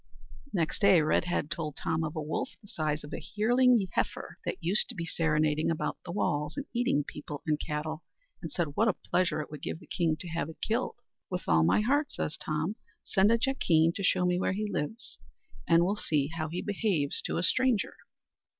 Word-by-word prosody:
Next 165 -5 -1
day, 195 -6 +6
Redhead 165 0 +1
told 160 -4 -3
Tom 160 0 -1
of 155 +1 -3
a 155 - -2
wolf, 150 - -2
the 205 - -17
size 155 -4 -2
of 150 - -9
a - - -4
yearling 240 0 +4
heifer, - - -2
that - - -1
used 185 +5 +2
to 245 - -6
be 170 -3 -3
serenading 155 -2 +1
about 165 - -2
the 175 - -6
walls, 150 -5 -1
and 280 - -3
eating 240 - +2
people 145 -1 -7
and 150 -2 +1
cattle; 155 +1 -3 0.4
and - - -6
said 170 -4 -1
what 225 - +3
a 215 - +4
pleasure 180 -4 0
it 150 - -8
would 150 -3 -8
give - - -3
the - - -15
king 165 -3 0
to 180 - -6
have 165 -2 -2
it 160 - -10
killed. 230 +4 -1 0.3
"With 180 -1 -3
all 80 -1 +5
my 80 - +4
heart," 285 +6 +1
says 150 - -2
Tom; 155 +7 -2 0.3
"send 195 0 +3
a 230 - +5
jackeen 170 -11 +3
to - - -5
show 185 -1 +3
me 180 0 +2
where 185 - +1
he 210 +2 -2
lives, 205 +5 -4 0.5
and 170 0 +5
we'll 200 +3 +1
see 150 -7 0
how 155 -1 -2
he 175 +3 -3
behaves 195 -8 0
to - - -1
a 170 - 0
stranger." 250 +3 +2
170 Hz, 210 wpm, -30 LUFS, 155-205 Hz, 0.5 s, day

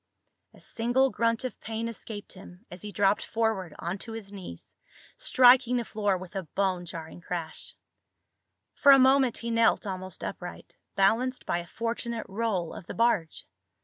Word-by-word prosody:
A - - -17
single 245 +3 +1
grunt 230 +1 0
of 255 - -5
pain 225 +1 -3
escaped 220 -2 -8
him 185 +2 -14
as 175 0 -9
he 210 - -7
dropped 205 0 +2
forward 220 -7 -1
onto 190 +6 -5
his 215 -3 -8
knees, 185 - -10 0.4
striking 250 0 +5
the 240 - -2
floor 205 -3 0
with 185 +2 -11
a 195 - -1
bone 185 +1 -1
jarring 165 0 -8
crash. 170 -2 -5 1.0
For 280 - +6
a 275 - +9
moment 265 -2 +4
he 235 0 -4
knelt 230 -1 +3
almost 185 -2 -6
upright, 180 -1 -7 0.2
balanced 235 +6 +2
by 175 - 0
a 170 - -8
fortunate 230 +1 -3
roll 195 -5 -2
of 170 - -10
the - - -6
barge. 215 -9 +1
210 Hz, 160 wpm, -28 LUFS, 185-235 Hz, 1.0 s, a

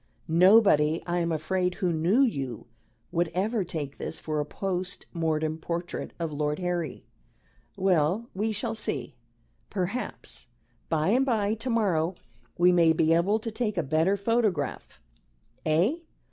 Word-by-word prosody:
Nobody, 170 -3 +5
I 175 0 0
am 170 -1 0
afraid, 180 +3 0
who 180 -3 0
knew 175 +11 +3
you, 135 - -1 0.5
would 175 0 +1
ever 210 +3 +1
take 150 -5 -5
this 160 - -4
for 155 -1 -2
a 150 - -1
post 185 +2 -3
mortem 160 -2 -1
portrait 170 +2 -4
of 165 -3 -3
Lord 150 0 -1
Harry. 175 -5 -3 0.7
Well, 185 +3 +2
we 215 +4 -1
shall 225 +2 -2
see. 150 - -3 0.6
Perhaps 200 +6 -4 0.4
by 155 +1 +1
and 250 +5 +4
by 215 -5 +1
to 225 +4 -4
morrow 190 -7 +1 0.4
we 180 +1 +5
may 170 -2 +5
be 160 0 +3
able 185 +6 +3
to 225 - -4
take 215 -3 -2
a 170 - +1
better 160 +7 +2
photograph. 215 -2 -1 0.7
Eh?" 175 - +3
175 Hz, 145 wpm, -27 LUFS, 160-205 Hz, 0.7 s, Nobody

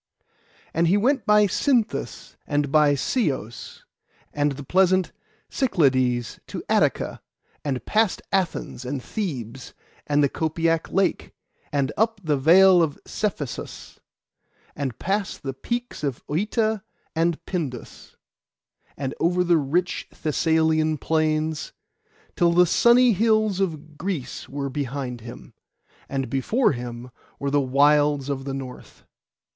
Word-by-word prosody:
And 165 +2 +2
he 190 +5 +4
went 260 +4 +1
by 210 0 +6
Cythnus, 235 +2 -1
and 145 -1 0
by 150 -1 +4
Ceos, 135 - -3 0.5
and 145 -1 +1
the 140 +1 -8
pleasant 185 +3 +2 0.4
Cyclades 130 - +1
to - - -6
Attica; - - +1 0.4
and 135 -4 -3
past 215 -2 +1
Athens 185 -8 -1
and 130 0 -4
Thebes, 135 - -5 0.3
and 145 0 +3
the - - +5
Copaic 165 +2 -1
lake, 195 0 0 0.4
and 140 -2 0
up 225 0 +1
the 155 -3 +1
vale 175 +6 +6
of 155 -4 0
Cephissus, 155 - -5 0.8
and 135 -5 -3
past 195 +1 -2
the 135 -1 -3
peaks 240 - -4
of 140 -4 -3
Œta 215 - 0 0.3
and 165 0 +1
Pindus, 145 -10 -6 0.8
and 135 -1 -3
over 180 +2 +2
the 175 -1 +3
rich 170 +6 -1
Thessalian 160 0 +1
plains, 155 0 -1 0.6
till 170 -1 +3
the 180 +1 +6
sunny 240 +6 +5
hills 215 -1 +2
of 155 -5 -3
Greece 165 -9 -4
were 140 0 -4
behind 130 -3 -4
him, 120 +1 -11 0.6
and 135 -1 -2
before 140 - +1
him 120 -1 -6 0.3
were 140 0 -2
the 145 0 +3
wilds 145 +1 +3
of 135 -1 -3
the 135 - -3
north. 130 -2 -9
155 Hz, 125 wpm, -24 LUFS, 135-190 Hz, 0.8 s, by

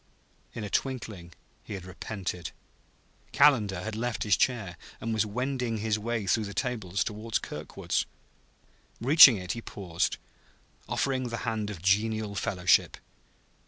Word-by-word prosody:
In 115 - -4
a 105 - -4
twinkling 105 -10 -3 0.3
he 100 - -6
had 95 -2 -8
repented; 90 -1 -5 0.8
Calendar 110 -11 +4
had 110 0 -4
left 120 +1 -2
his 105 -3 +4
chair 110 -9 0 0.2
and 115 0 -3
was 110 -1 +1
wending 125 +1 -2
his 110 0 0
way 115 -1 -2
through 105 +3 +1
the 100 -1 -7
tables 100 -5 -1
toward 110 +1 -2
Kirkwood's. - - -3 0.9
Reaching 135 -1 +9
it, 90 -2 -4
he 115 - -4
paused, 90 -7 -2 0.7
offering 130 -2 0
the 115 -1 -4
hand 110 -2 -2
of 90 -5 -8
genial 105 +2 +1
fellowship. 95 -4 +2
110 Hz, 135 wpm, -28 LUFS, 100-115 Hz, 0.9 s, Reaching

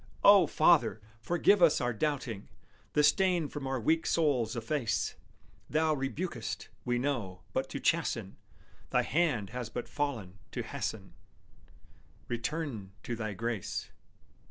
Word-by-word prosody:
O 200 -4 +8
Father! 150 -9 +4 0.2
forgive 175 - +3
us 165 -3 +6
our 120 -1 0
doubting; 125 -5 -2 0.4
The 150 - +4
stain 180 -1 +3
from 145 -2 -5
our 135 -1 -1
weak 160 +8 +2
souls 130 -9 +2
efface; 115 +1 -1 0.6
Thou 155 +1 +2
rebukest, 150 +6 -3
we 120 0 0
know, 120 -8 -2
but - - -1
to - - -4
chasten, - - 0 0.5
Thy - - +2
hand 140 - +1
has 125 -2 -4
but 120 +1 -5
fallen 115 -10 -3
to - - -2
hasten - - -5 1.1
Return 120 -5 -3
to 120 - -3
Thy 110 -2 -3
grace. 115 0 -3
135 Hz, 130 wpm, -31 LUFS, 115-155 Hz, 1.1 s, O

